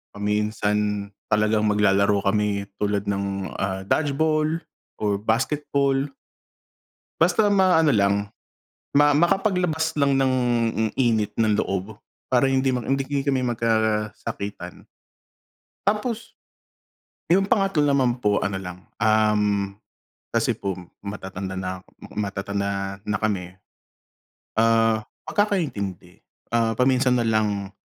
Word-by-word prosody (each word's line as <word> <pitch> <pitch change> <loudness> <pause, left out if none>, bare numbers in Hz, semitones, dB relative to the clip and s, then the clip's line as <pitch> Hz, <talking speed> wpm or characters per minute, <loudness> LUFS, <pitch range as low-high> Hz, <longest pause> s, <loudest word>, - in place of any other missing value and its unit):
Paminsan 105 0 -1 0.2
talagang 105 0 +2
mag-lalaro 100 -1 +3
kami 100 0 +1 0.2
tulad 105 -1 0
ng, 100 -1 -2
ah, 95 0 -2
dodgeball, 155 +6 +1 0.4
or 100 -2 0
basketball. 140 +3 0 1.1
Basta 180 +5 +4
ma-ano 185 -5 +4
lang, 100 -3 +2 0.7
ma 145 0 +6
makapag-labas 175 -1 +1
lang 140 -1 +3
ng 135 -1 +2 0.6
init 115 -5 +1
ng 110 -2 +2
loob, 95 +2 -3 0.4
para 130 +2 +4
hindi 135 0 +2
hindi 135 +2 -1
kami 140 -2 0
magka-sakitan. 110 -3 -2 0.9
Tapos, 215 +3 -2 0.9
'yung 195 +2 +4
pangatlo 195 -8 +2
naman 130 -3 +2
po 105 -3 +1
ano 95 -1 -2
lang, 90 -1 -8 0.2
um, 105 -2 +2 0.6
kasi - - +1
po 95 -1 -2 0.3
matatanda 95 -1 -5
na 95 -1 -5 0.3
matatanda 100 -1 -2
na 105 - 0
kami. 95 -4 -2 1.0
Ah, 115 -1 +3 0.2
pagkakaintindi, 110 - -2 0.3
ah, 115 -1 +1
paminsan 125 -1 +3
nalang, 105 -3 0
110 Hz, 95 wpm, -24 LUFS, 100-140 Hz, 1.1 s, ma